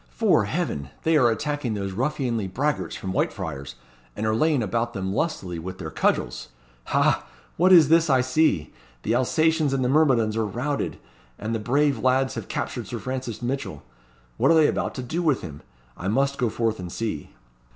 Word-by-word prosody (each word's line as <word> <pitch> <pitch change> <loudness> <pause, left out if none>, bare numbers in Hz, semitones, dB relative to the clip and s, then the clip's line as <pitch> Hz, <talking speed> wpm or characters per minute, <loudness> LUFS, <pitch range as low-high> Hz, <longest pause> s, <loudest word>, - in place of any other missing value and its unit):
'Fore - - +2
heaven! 70 -1 -2
they 160 0 +3
are 125 -5 +5
attacking 130 0 -2
those 100 -1 -3
ruffianly 125 -2 -1
braggarts 140 +11 -1
from 95 - -5
Whitefriars, 70 -6 -3 0.4
and 105 - -3
are 110 - +2
laying 145 +1 +2
about 115 +3 -1
them 95 -3 -3
lustily 95 - -2
with 95 +3 -7
their 80 -4 -6
cudgels. - - 0 0.4
Ha! - - +2 0.3
what 185 +3 +4
is 165 -5 +8
this 165 +1 +4
I 130 -2 +4
see? 130 - +1 0.3
The 110 - 0
Alsatians 155 +4 +2
and 130 -2 0
the - - +1
myrmidons 130 -7 +3
are 115 - +1
routed, 130 +8 -2 0.4
and 110 +2 -4
the 115 - -1
brave 140 +4 +1
lads 130 +2 +2
have - - -6
captured - - -4
Sir - - -4
Francis 125 -3 -5
Mitchell. 125 - -3 0.5
What - - +3
are 165 - +6
they 160 -1 +6
about - - -2
to 130 - -4
do 160 +8 -2
with 155 -6 +2
him? 75 -2 -8 0.3
I 90 - -5
must 140 +6 +1
go 120 -3 +2
forth 110 -1 -1
and 90 -1 -6
see." 105 -10 -4
120 Hz, 185 wpm, -24 LUFS, 105-145 Hz, 0.5 s, is